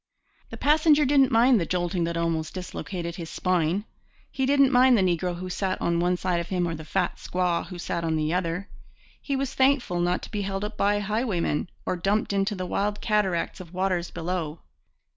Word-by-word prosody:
The -, -, -8 dB
passenger 300 Hz, 0 st, +4 dB
didn't 270 Hz, -1 st, +4 dB
mind 235 Hz, +1 st, +5 dB
the -, -, 0 dB
jolting 175 Hz, -1 st, 0 dB
that 170 Hz, 0 st, -2 dB
almost 165 Hz, -1 st, -1 dB
dislocated 180 Hz, -1 st, -5 dB
his 165 Hz, -3 st, -6 dB
spine. 180 Hz, +2 st, 0 dB, 0.5 s
He 265 Hz, -1 st, -1 dB
didn't 275 Hz, -1 st, +4 dB
mind 250 Hz, -1 st, +6 dB
the 195 Hz, -, +3 dB
negro 175 Hz, 0 st, 0 dB
who 185 Hz, +1 st, -6 dB
sat 185 Hz, +1 st, -2 dB
on 170 Hz, 0 st, 0 dB
one 180 Hz, +1 st, +1 dB
side 180 Hz, -1 st, 0 dB
of 170 Hz, 0 st, -5 dB
him 180 Hz, -2 st, 0 dB
or 165 Hz, -, -2 dB
the 160 Hz, 0 st, -7 dB
fat 180 Hz, +3 st, -1 dB
squaw 180 Hz, -2 st, -1 dB
who 180 Hz, -, -8 dB
sat 170 Hz, -1 st, -3 dB
on 160 Hz, -1 st, 0 dB
the 155 Hz, +1 st, 0 dB
other. 180 Hz, +2 st, -2 dB, 0.5 s
He 280 Hz, -, -2 dB
was 270 Hz, -1 st, -2 dB
thankful 260 Hz, -9 st, +2 dB
not 175 Hz, +1 st, 0 dB
to -, -, -9 dB
be 210 Hz, -2 st, -2 dB
held 195 Hz, 0 st, -3 dB
up 210 Hz, 0 st, -6 dB
by 205 Hz, 0 st, +1 dB
highwaymen, 205 Hz, -7 st, -1 dB, 0.2 s
or 185 Hz, -, -1 dB
dumped 200 Hz, +4 st, 0 dB
into 200 Hz, +2 st, 0 dB
the 185 Hz, -1 st, -4 dB
wild 205 Hz, +3 st, -1 dB
cataract 210 Hz, -6 st, 0 dB
of 180 Hz, -1 st, -11 dB
waters 185 Hz, -2 st, 0 dB
below. 165 Hz, -2 st, -4 dB
185 Hz, 200 wpm, -26 LUFS, 170-210 Hz, 0.5 s, mind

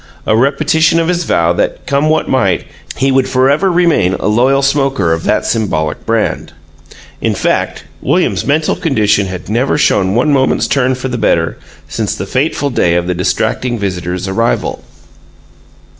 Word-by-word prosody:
a 110 Hz, -, +2 dB
repetition 150 Hz, +6 st, +2 dB
of 165 Hz, -, 0 dB
his 175 Hz, -1 st, -1 dB
vow 85 Hz, +1 st, +2 dB
that, -, -, -2 dB
come 140 Hz, +2 st, +1 dB
what 155 Hz, 0 st, +1 dB
might, 100 Hz, -9 st, +1 dB, 0.3 s
he 135 Hz, +1 st, +1 dB
would 130 Hz, 0 st, +1 dB
forever 140 Hz, +9 st, +2 dB
remain 165 Hz, -, +2 dB
a -, -, -5 dB
loyal 130 Hz, +6 st, +2 dB
smoker 135 Hz, -, +1 dB
of 80 Hz, 0 st, -4 dB
that -, -, +1 dB
symbolic 90 Hz, -9 st, -2 dB
brand. 115 Hz, -1 st, -1 dB, 0.7 s
In -, -, 0 dB
fact, -, -, -1 dB, 0.2 s
William's 95 Hz, +1 st, 0 dB
mental 150 Hz, +5 st, +1 dB
condition 105 Hz, -, +1 dB
had 90 Hz, -1 st, -7 dB
never 120 Hz, +7 st, 0 dB
shown 100 Hz, -9 st, +2 dB
one 135 Hz, +5 st, +2 dB
moment's 130 Hz, -1 st, +2 dB
turn 130 Hz, -1 st, +1 dB
for 130 Hz, +1 st, -5 dB
the 125 Hz, -2 st, -4 dB
better 80 Hz, -5 st, 0 dB, 0.3 s
since -, -, -3 dB
the 95 Hz, -, -5 dB
fateful 140 Hz, +5 st, -1 dB
day 85 Hz, -7 st, +1 dB
of 85 Hz, 0 st, 0 dB
the 90 Hz, -, -1 dB
distracting 110 Hz, +6 st, -1 dB
visitor's 90 Hz, -2 st, -3 dB
arrival. 115 Hz, +5 st, -1 dB
120 Hz, 160 wpm, -13 LUFS, 95-140 Hz, 0.7 s, a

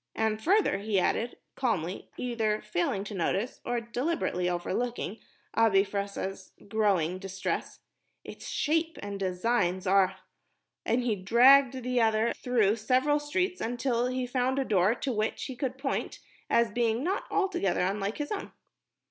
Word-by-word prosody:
"And 220 Hz, 0 st, 0 dB
further," 385 Hz, -, +3 dB
he 205 Hz, -1 st, +1 dB
added, 230 Hz, +6 st, 0 dB, 0.2 s
calmly, 195 Hz, -8 st, -2 dB
either 225 Hz, -4 st, 0 dB
failing 195 Hz, -1 st, -1 dB
to 210 Hz, -, -7 dB
notice, 195 Hz, +5 st, -1 dB
or 240 Hz, 0 st, -1 dB
deliberately 235 Hz, -, -1 dB
overlooking 215 Hz, +5 st, -2 dB, 0.3 s
Abi 215 Hz, -4 st, +4 dB
Fressah's 200 Hz, -1 st, -4 dB
growing 195 Hz, -5 st, +1 dB
distress, 190 Hz, 0 st, -4 dB, 0.4 s
"its -, -, -9 dB
shape 325 Hz, +2 st, 0 dB
and 200 Hz, -1 st, -5 dB
design 185 Hz, 0 st, 0 dB
are...!" 190 Hz, 0 st, +3 dB, 0.7 s
and 240 Hz, +2 st, +2 dB
he 235 Hz, -3 st, +1 dB
dragged 255 Hz, +6 st, +5 dB
the 250 Hz, 0 st, +1 dB
other 220 Hz, +1 st, +2 dB
through 230 Hz, -4 st, +1 dB
several 260 Hz, +6 st, +2 dB
streets 365 Hz, +6 st, -1 dB
until 240 Hz, +1 st, 0 dB
he 255 Hz, 0 st, -2 dB
found 255 Hz, +1 st, 0 dB
a 270 Hz, -, +1 dB
door 200 Hz, +1 st, +3 dB
to 260 Hz, +1 st, -2 dB
which 215 Hz, 0 st, -1 dB
he 260 Hz, -, -5 dB
could 255 Hz, 0 st, -3 dB
point 270 Hz, 0 st, -2 dB, 0.3 s
as 235 Hz, -2 st, +3 dB
being 235 Hz, +2 st, 0 dB
not 380 Hz, +5 st, -1 dB
altogether 385 Hz, -, 0 dB
unlike 195 Hz, +3 st, -1 dB
his 295 Hz, -1 st, -4 dB
own. 410 Hz, -, -4 dB
225 Hz, 145 wpm, -29 LUFS, 195-255 Hz, 0.7 s, dragged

